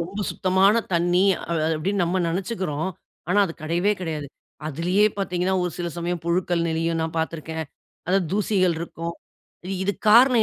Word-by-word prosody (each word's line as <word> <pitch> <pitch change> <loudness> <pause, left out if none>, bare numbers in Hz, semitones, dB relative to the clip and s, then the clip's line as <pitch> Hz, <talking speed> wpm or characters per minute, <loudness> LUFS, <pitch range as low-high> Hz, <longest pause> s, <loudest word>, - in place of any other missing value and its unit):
ரொம்ப 190 +5 -4
சுத்தமான 190 +2 +3 0.2
தண்ணி 175 +1 +3 0.2
அ - - -8 0.3
அப்படின்னு 195 +5 0
நம்ம 180 +2 0
நினைச்சுக்கிறோம். 180 -3 -2 0.4
ஆனா 190 +4 +3
அது 165 - -6
கிடையவே 175 +6 +1
கிடையாது. 155 -4 -3 0.4
அதுலேயே 175 +7 +2
பார்த்தீங்கன்னா 185 -1 0
ஒரு 180 - -1
சில 175 -1 -2
சமயம் 170 0 -2
புழுக்கள் 170 0 +1
நெளியும், 165 0 0
நான் 160 0 -3
பார்த்திருக்கேன். 160 0 -3 0.4
அதாவது 185 0 +2
தூசிகள் 195 -3 +2
இருக்கும். 170 0 -5 0.7
இதுக்கு 200 +1 -2
காரணம் 245 0 +7
175 Hz, 145 wpm, -24 LUFS, 165-190 Hz, 0.7 s, காரணம்